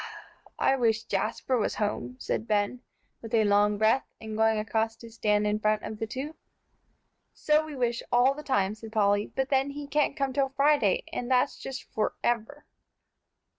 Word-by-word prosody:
"I 270 - +3
wish 225 -3 +1
Jasper 225 +5 -1
was 210 - -1
home," 165 - -2
said 225 - -3
Ben, 210 +3 0 0.4
with 225 0 -3
a 220 - +4
long 205 0 +3
breath, 220 +5 +2
and 220 -1 -6
going 220 0 +3
across 220 +1 -1
to 230 0 -13
stand 210 -2 +1
in 210 0 0
front 215 0 +1
of 215 - -6
the 225 - -2
two. 270 +7 -5 1.0
"So 305 0 +2
we 310 -2 -8
wish 240 -2 0
all 250 +2 +4
the 300 - -8
time," 205 -9 +1
said 220 0 -10
Polly, 205 -1 +2
"but 265 0 -1
then, 270 0 +2
he 290 +1 -6
can't 295 0 0
come 275 -2 -1
till 270 0 +1
Friday, 275 -6 +2
and 245 - -3
that's 255 +2 +2
just 270 0 -6
forever." 240 +5 -2
225 Hz, 175 wpm, -28 LUFS, 215-270 Hz, 1.0 s, a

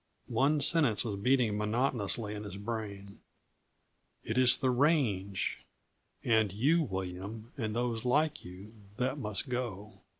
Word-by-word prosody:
One 145 +2 +2
sentence 140 -8 +4
was 105 -3 -2
beating 120 0 +2
monotonously 110 -1 +1
in 105 0 -6
his 100 -2 -7
brain: 100 -2 -6 1.0
"It 110 - -3
is 130 -1 +5
the 130 -2 +1
range 120 - +1 0.6
and 110 -4 +2
you, 140 - +2
William, 100 - -5
and 110 -5 -3
those 120 -2 -1
like 150 +5 +1
you 95 +5 -11 0.2
that 130 +3 -1
must 105 -5 -1
go." 115 -5 -5
110 Hz, 130 wpm, -31 LUFS, 100-130 Hz, 1.0 s, is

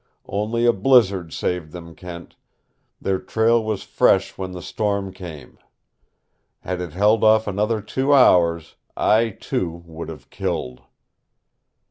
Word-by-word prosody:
Only 110 +4 -1
a 120 - +5
blizzard 100 -6 +3
saved 85 -3 -3
them, 85 -1 -9
Kent. 85 +1 -10 0.6
Their 95 -1 -1
trail 115 +1 +2
was 110 -2 -3
fresh - - +2
when 95 -1 -5
the 90 -1 -7
storm 100 -3 -2
came. 85 -6 -10 1.0
Had 90 -1 -4
it 85 -4 -6
held 105 +4 +3
off 110 0 +5
another 105 +2 -1
two 130 +6 -1
hours, 85 - +4 0.2
I, 115 +2 +3
too, 85 -4 -4
would 80 -1 -8
have 80 - -11
killed. 65 0 -4
95 Hz, 130 wpm, -22 LUFS, 85-110 Hz, 1.0 s, a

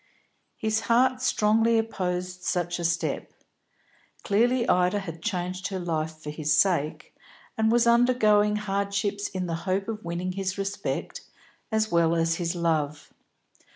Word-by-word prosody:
His 220 0 0
heart 255 +2 +3
strongly 225 -1 +3
opposed 180 -4 -2
such 175 -1 -1
a - - -3
step. 165 -2 -1 0.9
Clearly 240 +4 +2
Ida 180 +2 +3
had 165 -4 -8
changed 185 -1 -3
her 195 - -4
life 160 -3 -2
for 150 -1 -7
his 150 0 -2
sake, 165 -6 0 0.4
and 220 0 +2
was 240 0 +4
undergoing 235 -3 +4
hardships 200 0 -1
in 185 -2 -4
the 170 - -3 0.2
hope 195 +1 0
of 220 -1 -5
winning 175 +2 -3
his 190 0 -3
respect 195 +1 -3 0.5
as 220 0 +1
well 170 -1 +3
as 165 0 +1
his 175 0 -2
love. 155 -3 -1
190 Hz, 140 wpm, -26 LUFS, 170-215 Hz, 0.9 s, was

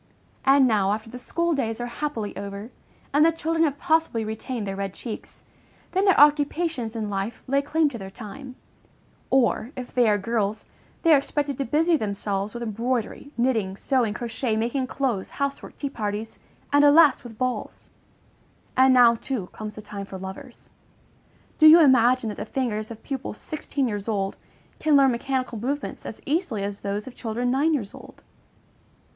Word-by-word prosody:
And 270 0 +6
now, 205 -4 +2
after 220 +1 -6
the 250 - -8
school 340 +6 -1
days 230 -6 -2
are 240 - -2
happily 240 -4 -4
over, 200 +3 -7 0.4
and 295 +2 +5
the 330 - +5
children 325 0 0
have 285 -2 -1
possibly 320 -9 +1
retained 220 +1 -4
their 195 -1 -4
red 195 -1 -4
cheeks, 230 -3 -7 0.5
then 380 +1 +1
their 385 - +5
occupations 290 -4 +3
in 220 -2 -2
life 195 +3 -4
lay 275 +1 +2
claim 310 +2 +1
to 240 -5 -8
their 190 -1 -7
time; 250 +6 -9 0.7
or, 250 -3 +2
if 250 -1 -7
they 245 -3 +4
are 205 - +3
girls, 215 0 -2 0.4
they 330 -2 +6
are 285 - +7
expected 285 -1 -3
to 275 - 0
busy 320 +6 +2
themselves 200 -1 -3
with 240 - -4
embroidery, 235 +4 -2
knitting, 225 -6 0
sewing, 240 -5 0
crochet, 235 0 -2
making 240 +4 -1
clothes, 255 -8 -2
house 280 0 -1
work, - - -12
tea 285 - -3
parties, 215 +1 -4 0.3
and 290 0 +6
alas! 290 -1 +6
with 230 -3 -11
balls; 255 +1 -4 0.8
and 260 0 +5
now, 240 -2 +7
too, 230 -5 -4
comes 215 -1 -7
the 215 - -9
time 200 -1 -7
for 190 - -7
lovers. 190 0 -10 0.9
Do 310 - +8
you 320 +2 +10
imagine 255 -4 +5
that 210 - -6
the 210 - -4
fingers 220 -4 -2
of 225 -1 -10
pupils 265 -5 -5
sixteen 290 -3 -3
years 205 -2 -4
old 200 -3 -1 0.4
can 310 -1 +3
learn 270 -1 +5
mechanical 255 -1 -2
movements 280 +6 -4
as - - -8
easily 285 - -1
as 200 0 -4
those 205 +1 -3
of 260 - -9
children 240 +1 -2
nine 300 +5 +2
years 210 -8 -4
old? - - -14
245 Hz, 175 wpm, -25 LUFS, 215-280 Hz, 0.9 s, you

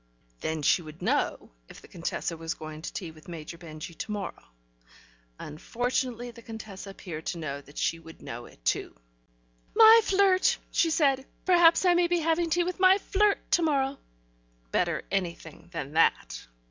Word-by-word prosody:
(Then 160 -1 -3
she 175 - +4
would 155 -1 -11
know - - 0 0.2
if - - -12
the - - -13
Contessa 170 0 -3
was 165 0 -4
going 155 0 -8
to - - -6
tea 175 -4 -6
with 155 -1 -17
Major 165 -1 -8
Benjy 160 -1 -9
to 215 - -4
morrow... 205 -3 -5 0.9
unfortunately 245 - -3
the 235 0 -14
Contessa 215 -4 -9
appeared 170 -5 -8
to 175 - -2
know 140 -3 -5
that 145 +1 -17
she 165 - 0
would 165 0 -13
know 120 +1 -8
it, - - -20
too.) - - 0 0.8
"My 450 +1 +9
flirt!" 385 -2 +3
she 335 - +2
said. 275 -4 +2 0.2
"Perhaps 345 -1 +5
I 355 - +6
may 350 0 +3
be 350 0 +1
having 330 +1 +1
tea 350 +2 +2
with 360 +1 -4
my 375 +1 +6
flirt 410 0 +2
to 345 - +4
morrow." 280 -4 +1 0.7
Better - - 0
anything 175 -4 -4
than 145 -5 -5
that. 165 +1 +1
210 Hz, 170 wpm, -28 LUFS, -, 0.9 s, My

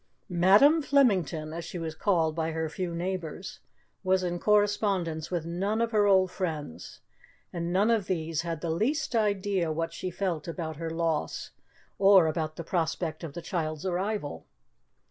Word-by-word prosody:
'Madam' 200 - +5
Flemington, 185 - +2
as 170 +1 -5
she 170 - -6
was 165 -2 -4
called 160 -2 +1
by 160 0 -1
her 160 0 -1
few 175 +1 -4
neighbours, 180 0 -4 0.4
was 185 0 +2
in 175 -1 -2
correspondence 200 -6 +1
with 175 -3 -2
none 195 +6 -1
of 230 0 0
her 210 -2 +3
old 190 -2 +4
friends, 155 - -5 0.5
and 170 -1 -3
none 200 +5 +3
of 215 -5 +1
these 165 -3 -1
had 165 -2 -4
the 170 - -2
least 250 - 0
idea 200 -5 +1
what 165 +1 -2
she 185 - -4
felt 175 -3 -3
about 160 -2 -5
her 165 0 -4
loss 165 -1 -2 0.5
or 195 -3 +7
about 155 -1 -2
the 170 - -6
prospect 165 -1 -2
of 155 -4 -6
the 170 - -7
child's 160 -3 -3
arrival. 185 - -2
175 Hz, 165 wpm, -28 LUFS, 160-195 Hz, 0.5 s, or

